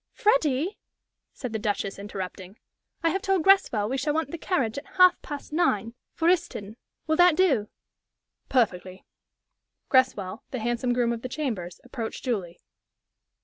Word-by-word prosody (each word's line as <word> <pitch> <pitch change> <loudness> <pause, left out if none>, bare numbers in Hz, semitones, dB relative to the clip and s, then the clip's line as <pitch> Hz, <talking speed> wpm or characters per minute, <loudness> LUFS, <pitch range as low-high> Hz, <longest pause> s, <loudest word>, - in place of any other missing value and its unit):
"Freddie," 350 - +1 0.5
said 250 -4 -6
the 220 - -1
Duchess, 205 -2 -2
interrupting, 190 0 -7 0.5
"I 330 - +3
have 385 - -1
told 385 -4 +1
Greswell 380 - +4
we 265 +4 -1
shall 295 +3 0
want 320 -2 -1
the 335 - -4
carriage 270 - 0
at 295 - -18
half 365 -1 +6
past 290 0 -7
nine 230 - +1 0.2
for 325 - 0
Euston. 330 - 0 0.3
Will 315 0 +1
that 355 -2 +6
do?" 275 - +3 0.8
"Perfectly." 185 -7 0 0.8
Greswell, 235 -5 +2
the 255 - -4
handsome 240 +2 -1
groom 240 -1 +1
of 230 - -5
the 255 - -5
chambers, 225 - -4
approached 235 -3 -6
Julie. 190 -9 -2
250 Hz, 145 wpm, -26 LUFS, 210-320 Hz, 0.8 s, half